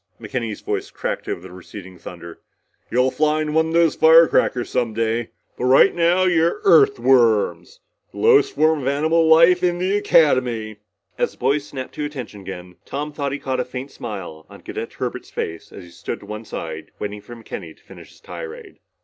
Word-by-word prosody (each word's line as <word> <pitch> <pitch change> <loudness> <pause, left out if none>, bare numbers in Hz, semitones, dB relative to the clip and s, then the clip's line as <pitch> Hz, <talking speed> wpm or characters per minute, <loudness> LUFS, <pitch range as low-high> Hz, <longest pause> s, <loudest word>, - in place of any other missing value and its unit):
McKenny's 115 -4 -4
voice - - -3
crackled - - -4
over 90 +2 -12
the 90 - -14
receding 90 0 -11
thunder. 85 0 -10 0.5
"You'll 125 +2 +2
fly 155 0 +1
one 160 +1 +1
of 160 - -4
those 165 -1 +3
firecrackers 160 -6 +4
some 120 -4 -1
day. 115 +1 -1 0.3
But 125 - -1
right 130 +9 +6
now 175 +2 +2
you're 170 - +2
Earthworms, 395 - +3 0.3
the - - -14
lowest 415 -3 +4
form 155 -1 +2
of 130 - -4
animal 160 +4 +2
life 170 +3 +6
in 175 -1 +1
the 185 +3 0
Academy!" 130 - +2 0.4
As - - 0
the - - -22
boys 145 +1 0
snapped 130 -2 -7
to 150 - -4
attention 125 -8 -7
again, 90 -2 -9
Tom 145 +2 -5
thought 140 -2 -3
he 145 - -2
caught 130 -2 -3
a - - +1
faint 125 +2 -7
smile 95 -8 -8
on - - -14
Cadet - - -6
Herbert's - - -5
face 80 0 -6
as 95 - -10
he 85 - -15
stood 85 - -6
to - - -12
one 105 +2 -7
side 80 -5 -7
waiting 105 0 -5
for 120 +4 -11
McKenny 115 - -9
to - - -27
finish - - -14
his - - -20
tirade. 465 -3 -9
135 Hz, 190 wpm, -21 LUFS, 110-165 Hz, 0.5 s, right